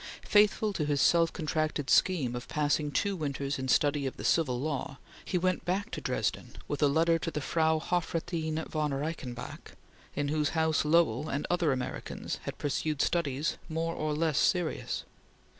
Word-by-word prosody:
Faithful 210 0 +3
to 155 - -1
his 145 -1 0
self 165 +2 +4
contracted 155 -3 -1
scheme 145 -11 +3
of 120 - -6
passing 150 0 +1
two 200 +6 0
winters 140 -3 -2
in 130 - -3
study 145 +1 +2
of 130 - -6
the - - -7
Civil 130 -7 +2
Law, 140 -1 -3 0.3
he 180 - -1
went 185 +1 0
back 200 +5 -1
to - - -4
Dresden - - -2
with 145 - -3
a 145 - +6
letter 165 +3 +3
to 165 - -2
the 155 - -3
Frau 160 +2 +2
Hofrathin 165 -1 -2
von 150 -3 -1
Reichenbach, 135 -4 -5 0.4
in 145 -1 -1
whose 150 -1 +1
house 160 -1 +2
Lowell 160 0 +2
and 140 +2 -2
other 175 -4 +2
Americans 130 -1 -4
had - - -5
pursued 150 +1 -1
studies 150 -2 0
more 165 +1 -1
or 155 -2 -2
less 155 -1 +1
serious. 175 -3 0
155 Hz, 170 wpm, -30 LUFS, 145-165 Hz, 0.4 s, a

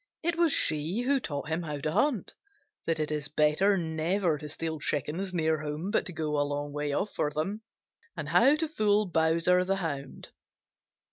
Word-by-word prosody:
It 340 +1 +1
was 335 -2 +3
she 160 - 0
who 270 +2 +2
taught 145 - -4
him 160 +2 0
how 150 -3 -4
to 155 +2 -2
hunt, 260 - +1 0.5
that 165 -1 +1
it 155 0 -1
is 150 -1 -1
better 155 +7 +3
never 165 0 0
to 150 -1 -7
steal 160 +1 -3
chickens 155 +7 -2
near 160 -3 +1
home 155 +6 -4
but - - +1
to - - -6
go 155 -2 -1
a - - +3
long 145 0 -2
way 145 0 -2
off 195 +8 -1
for 150 - 0
them, 175 +9 -3 0.6
and 155 -2 -4
how 235 - +5
to 320 +1 -1
fool 215 -7 +2
Bowser 170 +1 +3
the 195 +1 0
Hound. 145 -7 -5
160 Hz, 190 wpm, -29 LUFS, 150-195 Hz, 0.6 s, how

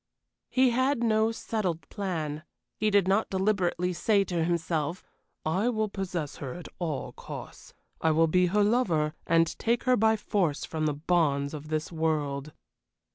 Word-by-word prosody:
He 260 -1 +4
had 260 +1 +1
no 220 0 +3
settled 200 -7 -3
plan. 160 -7 -3 0.3
He 215 - +1
did 200 -3 +3
not 200 +3 +2
deliberately 190 -2 +1
say 200 +3 +2
to 175 -4 -1
himself: 165 -1 -1 0.4
"I 185 +9 +1
will 220 -3 0
possess 180 -7 -4
her 135 0 -6
at 175 - -8
all 160 -6 -3
costs. - - -10 0.3
I 160 - +3
will 160 +1 +4
be 180 +3 +3
her 205 +4 +3
lover, 180 -10 +2
and 165 0 +5
take 235 +1 +1
her 255 -1 +4
by 220 -1 +4
force 185 -8 0
from 155 -1 -2
the 150 - 0
bonds 145 -3 +1
of 150 0 -7
this 155 +1 -2
world." 150 -3 -1
175 Hz, 160 wpm, -28 LUFS, 155-215 Hz, 0.4 s, and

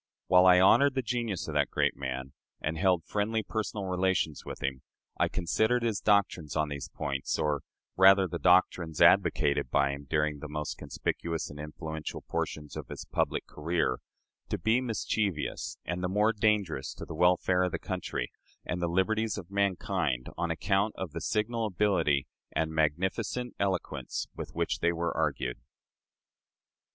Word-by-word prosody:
While 90 0 +6
I 90 0 +8
honored 135 +9 +5
the 130 - 0
genius 115 -5 -2
of - - -4
that - - +2
great - - +1
man, 65 0 -5 0.3
and 80 +2 -2
held 90 -1 +2
friendly 110 +2 -1
personal 105 -1 -3
relations 90 -4 0
with - - -7
him, 65 -1 -2 0.4
I - - +4
considered 110 +8 +1
his 115 -4 0
doctrines 95 -8 +1
on 75 -1 +1
these 70 -1 -5
points 70 -1 -2
or 75 -2 0 0.3
rather 95 0 +7
the 85 -1 -4
doctrines 90 -1 +3
advocated 70 -3 +4
by 70 +2 +2
him 70 0 -7
during 75 -1 +1
the 75 - -7
most 75 0 -4
conspicuous 85 -3 -3
and 75 - -10
influential 80 +1 -6
portions 75 -1 -4
of - - -6
his - - -7
public - - -1
career 80 -4 -1 0.5
to - - -1
be 110 +4 +2
mischievous, 110 -7 -2
and 90 +1 -3
the 90 - 0
more 105 +4 +3
dangerous 100 -9 0
to - - -7
the - - -7
welfare 90 +2 +3
of 90 -1 +1
the - - -1
country - - -4 0.3
and 90 - -3
the 85 - +1
liberties 110 +6 +1
of 95 -2 -8
mankind 95 -9 0
on 85 -1 -1
account 95 +6 +1
of 95 -4 -4
the 85 +2 -5
signal 110 +5 0
ability 85 -9 +2 0.3
and 80 0 0
magnificent 95 +10 -1
eloquence 90 -9 -2
with - - -7
which - - -1
they 85 - +2
were 85 0 -2
argued. - - -1
90 Hz, 165 wpm, -30 LUFS, 75-100 Hz, 0.5 s, I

